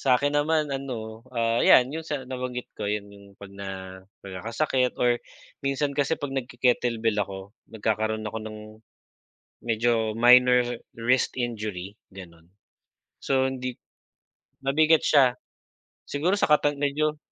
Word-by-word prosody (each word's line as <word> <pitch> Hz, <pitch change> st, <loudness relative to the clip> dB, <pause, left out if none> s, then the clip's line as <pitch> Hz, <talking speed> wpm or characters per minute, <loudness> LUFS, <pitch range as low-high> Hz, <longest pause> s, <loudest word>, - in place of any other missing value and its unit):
sa'kin 140 Hz, +2 st, +2 dB
naman 150 Hz, 0 st, +1 dB
ano, 115 Hz, -5 st, -5 dB
ah, 115 Hz, -1 st, 0 dB
yan, 130 Hz, +3 st, +6 dB
yung 160 Hz, -, -3 dB
sa 145 Hz, -4 st, -4 dB
nabanggit 125 Hz, -1 st, -5 dB
ko, 105 Hz, -1 st, -4 dB
yan 105 Hz, -1 st, -2 dB
yung 100 Hz, -1 st, -16 dB
'pag 100 Hz, -1 st, -12 dB
na, 100 Hz, 0 st, -7 dB, 0.6 s
pagkakasakit 115 Hz, +7 st, -1 dB
or 120 Hz, -1 st, +2 dB, 0.4 s
minsan 140 Hz, +1 st, -1 dB
kasi 145 Hz, +3 st, 0 dB
'pag 145 Hz, -2 st, -5 dB
nag 135 Hz, -2 st, -3 dB
ke-kettlebell 115 Hz, -3 st, +1 dB
ako 95 Hz, 0 st, -6 dB, 0.2 s
nagkakaroon 110 Hz, 0 st, -1 dB
ako 110 Hz, +1 st, -4 dB
ng, 110 Hz, 0 st, -8 dB, 1.1 s
medyo 115 Hz, -1 st, +1 dB
minor 125 Hz, +2 st, +6 dB, 0.3 s
wrist 125 Hz, +3 st, +1 dB
injury 105 Hz, -5 st, -4 dB, 0.2 s
ganon. 85 Hz, -3 st, -13 dB, 0.7 s
So 130 Hz, -1 st, +1 dB
hindi, 130 Hz, -1 st, -4 dB, 0.9 s
mabigat 155 Hz, +4 st, +4 dB
siya. 130 Hz, -4 st, +4 dB, 0.7 s
Siguro 175 Hz, +8 st, 0 dB
sa -, -, +3 dB
kapa 145 Hz, -1 st, +3 dB
medyo. 150 Hz, +2 st, 0 dB
125 Hz, 130 wpm, -26 LUFS, 110-140 Hz, 1.1 s, yan